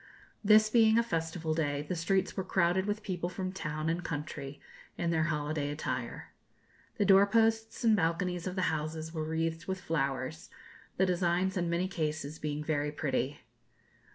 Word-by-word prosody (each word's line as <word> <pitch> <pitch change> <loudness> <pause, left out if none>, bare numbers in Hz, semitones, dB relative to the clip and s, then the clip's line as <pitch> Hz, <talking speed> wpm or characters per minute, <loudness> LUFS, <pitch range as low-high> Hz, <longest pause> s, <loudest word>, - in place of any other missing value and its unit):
This 215 +1 +7
being 225 -1 +5
a 235 - +4
festival 165 -5 -2
day, 145 -2 -1
the 165 +4 -3
streets 190 +3 0
were 190 - -1
crowded 185 +1 +2
with 210 +1 -2
people 180 -3 -2
from 185 0 -4
town 155 -4 -3
and 170 +2 0
country, 145 -3 -5 0.4
in 170 -1 0
their 160 0 +2
holiday 150 -2 -1
attire. 145 +1 -4 0.7
The 205 - +2
door 195 0 +7
posts 225 +1 +2
and 225 -2 +5
balconies 175 0 0
of 185 - -3
the 185 - 0
houses 155 +1 -4
were 160 -2 -2
wreathed 165 +1 -2
with 190 -1 -2
flowers, 140 -3 -2 0.5
the 190 - +4
designs 180 +1 +1
in 175 -2 0
many 170 +2 +1
cases 155 -4 -3
being 150 0 -3
very 150 -1 0
pretty. 145 -1 -2
165 Hz, 165 wpm, -31 LUFS, 155-190 Hz, 0.7 s, This